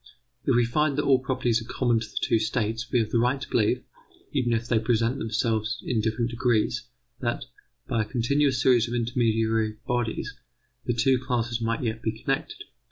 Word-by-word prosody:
If -, -, +3 dB
we 120 Hz, 0 st, +4 dB
find 145 Hz, +4 st, +1 dB
that 145 Hz, -, +1 dB
all 135 Hz, -2 st, +4 dB
properties 125 Hz, -3 st, 0 dB
are 115 Hz, -, -8 dB
common 120 Hz, -3 st, +2 dB
to 110 Hz, -1 st, -6 dB
the -, -, -11 dB
two 115 Hz, -, +2 dB
states 115 Hz, +2 st, -2 dB
we -, -, +3 dB
have 110 Hz, -2 st, 0 dB
the 115 Hz, -, +3 dB
right 125 Hz, +4 st, +2 dB
to 140 Hz, -, -6 dB
believe, 120 Hz, +3 st, +1 dB, 0.5 s
even 120 Hz, -1 st, +1 dB
if 115 Hz, 0 st, 0 dB
they 120 Hz, -2 st, +3 dB
presented 115 Hz, +2 st, +1 dB
themselves 110 Hz, 0 st, 0 dB
in 120 Hz, -4 st, +1 dB
different 115 Hz, +2 st, -1 dB
degrees, 115 Hz, -2 st, 0 dB, 0.3 s
that, -, -, -2 dB, 0.4 s
by 115 Hz, -, +1 dB
a -, -, -1 dB
continuous 130 Hz, +4 st, +1 dB
series 120 Hz, -2 st, +4 dB
of 120 Hz, -, -3 dB
intermediary 115 Hz, -2 st, +1 dB
bodies, 120 Hz, -2 st, -2 dB, 0.5 s
the 120 Hz, -, +1 dB
two 130 Hz, +2 st, +3 dB
classes 120 Hz, -2 st, -1 dB
might 115 Hz, +2 st, -1 dB
yet 110 Hz, -1 st, -2 dB
be 110 Hz, -, 0 dB
connected. 135 Hz, +5 st, -3 dB
115 Hz, 190 wpm, -26 LUFS, 110-125 Hz, 0.5 s, we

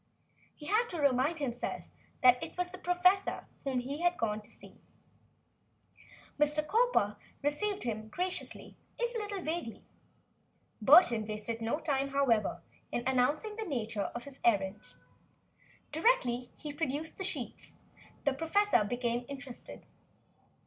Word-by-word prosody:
He 300 Hz, -, -11 dB
had 435 Hz, +7 st, +2 dB
to 345 Hz, -, -4 dB
remind 280 Hz, +3 st, +2 dB
himself 250 Hz, -5 st, -3 dB, 0.4 s
that 250 Hz, 0 st, +7 dB
it -, -, -8 dB
was 360 Hz, 0 st, -1 dB
the 370 Hz, -, -9 dB
professor 365 Hz, +2 st, +2 dB, 0.2 s
whom 260 Hz, -3 st, 0 dB
he 280 Hz, +5 st, -5 dB
had 350 Hz, 0 st, +2 dB
come 215 Hz, -1 st, -1 dB
to 210 Hz, -, -12 dB
see. -, -, -14 dB, 1.6 s
Mr. 300 Hz, +1 st, +3 dB
Cowper 445 Hz, -, +2 dB, 0.3 s
received 380 Hz, +8 st, 0 dB
him 220 Hz, -2 st, -3 dB
graciously, 360 Hz, +10 st, -4 dB, 0.2 s
if 480 Hz, 0 st, -1 dB
a 460 Hz, -, -2 dB
little 410 Hz, -3 st, -4 dB
vaguely. 315 Hz, -8 st, -4 dB, 1.0 s
Burton 235 Hz, -, +7 dB
wasted 220 Hz, +2 st, -4 dB
no 230 Hz, +7 st, 0 dB
time, 275 Hz, -3 st, 0 dB
however, 270 Hz, -6 st, +1 dB, 0.3 s
in 240 Hz, -, -1 dB
announcing 290 Hz, -, +1 dB
the 445 Hz, -, -2 dB
nature 230 Hz, -, -2 dB
of 240 Hz, -, -4 dB
his 275 Hz, 0 st, -9 dB
errand. 205 Hz, -2 st, +1 dB, 1.0 s
Directly 270 Hz, -, +2 dB
he 295 Hz, -1 st, -6 dB
produced 310 Hz, +2 st, -3 dB
the -, -, -2 dB
sheets, 380 Hz, -, -4 dB, 0.5 s
the 280 Hz, -, +3 dB
professor 325 Hz, -, +3 dB
became 240 Hz, +2 st, -1 dB
interested. 275 Hz, -3 st, -7 dB
280 Hz, 135 wpm, -32 LUFS, 240-355 Hz, 1.6 s, that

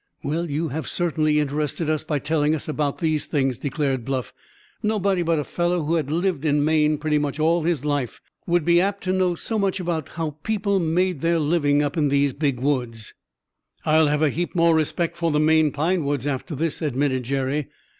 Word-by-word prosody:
"Well, 165 Hz, +4 st, -2 dB
you 155 Hz, +3 st, -1 dB
have 155 Hz, +4 st, -4 dB
certainly 155 Hz, -3 st, +1 dB
interested 150 Hz, +2 st, -2 dB
us 155 Hz, -1 st, 0 dB
by 155 Hz, -1 st, -1 dB
telling 150 Hz, +1 st, +1 dB
about 150 Hz, -2 st, -1 dB
these 155 Hz, -3 st, -1 dB
things," 135 Hz, -4 st, 0 dB
declared 140 Hz, -4 st, -1 dB
Bluff. 130 Hz, -2 st, -3 dB, 0.5 s
"Nobody 200 Hz, -3 st, +1 dB
but 165 Hz, -1 st, +1 dB
a 150 Hz, -, 0 dB
fellow 175 Hz, +2 st, -1 dB
who 155 Hz, +3 st, -1 dB
had 155 Hz, -5 st, 0 dB
lived 170 Hz, -1 st, 0 dB
in 145 Hz, -1 st, +2 dB
Maine 155 Hz, -1 st, +3 dB
pretty 150 Hz, 0 st, 0 dB
much 145 Hz, 0 st, -3 dB
all 165 Hz, +2 st, +3 dB
his 160 Hz, -3 st, -1 dB
life 145 Hz, -5 st, -2 dB, 0.3 s
would 175 Hz, -2 st, +2 dB
be 170 Hz, 0 st, +5 dB
apt 200 Hz, +1 st, -1 dB
to 185 Hz, 0 st, 0 dB
know 185 Hz, -2 st, +1 dB
so 220 Hz, +6 st, -2 dB
much 195 Hz, -1 st, 0 dB
about 170 Hz, -4 st, -3 dB
how 160 Hz, -3 st, -4 dB
people 200 Hz, -2 st, 0 dB
made 175 Hz, -1 st, 0 dB
their 170 Hz, 0 st, +2 dB
living 145 Hz, -2 st, +2 dB
up 145 Hz, +3 st, -2 dB
in 150 Hz, -2 st, +3 dB
these 140 Hz, -1 st, +2 dB
Big 140 Hz, -4 st, -1 dB
Woods." 120 Hz, -5 st, -2 dB, 0.7 s
"I'll 155 Hz, 0 st, +4 dB
have 150 Hz, +1 st, +1 dB
a 150 Hz, -, +3 dB
heap 175 Hz, +5 st, -3 dB
more 170 Hz, -1 st, +4 dB
respect 165 Hz, +2 st, 0 dB
for 170 Hz, -1 st, 0 dB
the 150 Hz, -1 st, +1 dB
Maine 155 Hz, 0 st, +4 dB
pine 160 Hz, +4 st, 0 dB
woods 140 Hz, -2 st, -1 dB
after 145 Hz, +3 st, -3 dB
this," 160 Hz, +4 st, -2 dB
admitted 140 Hz, -3 st, 0 dB
Jerry. 135 Hz, +3 st, -1 dB
155 Hz, 200 wpm, -23 LUFS, 145-170 Hz, 0.7 s, be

